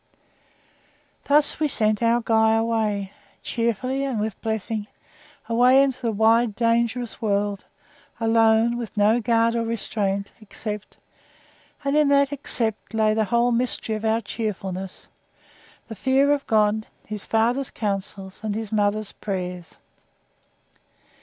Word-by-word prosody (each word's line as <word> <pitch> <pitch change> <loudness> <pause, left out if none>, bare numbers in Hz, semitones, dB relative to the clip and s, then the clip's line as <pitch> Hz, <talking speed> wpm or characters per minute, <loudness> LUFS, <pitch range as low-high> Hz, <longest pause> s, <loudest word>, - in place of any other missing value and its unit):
Thus 295 +1 +3
we 310 - +2
sent 215 -5 +1
our 235 +1 +3
Guy 220 -1 +3
away, 220 -3 -1 0.3
cheerfully 245 +4 -1
and 265 -5 -2
with 215 -1 -3
blessings 220 -1 -3 0.6
away 250 +4 +5
into 265 -2 -2
the 230 -2 0
wide, 220 +1 +3
dangerous 235 +1 0
world; 205 -2 -1 0.5
alone, 225 +1 +3
with 225 -3 -7
no 210 +3 +4
guard 230 0 +2
or 230 - 0
restraint, 200 -3 -2
except 210 0 -7 0.9
(and 280 +1 0
in 300 -1 +4
that 280 0 +3
EXCEPT 230 -5 -3
lay 215 -1 +3
the 220 0 +1
whole 235 +3 +2
mystery 235 -2 -1
of 215 - -6
our 220 +1 +1
cheerfulness) 195 -4 -5 0.8
the 225 - -7
fear 265 +6 +2
of 290 -1 0
God, 215 0 +2 0.2
his 210 -1 -6
father's 240 +4 +1
counsels, 195 -2 -4
and 210 -2 -2
his 220 -1 -5
mother's 210 0 0
prayers. 180 -3 -5
225 Hz, 125 wpm, -23 LUFS, 210-235 Hz, 0.9 s, away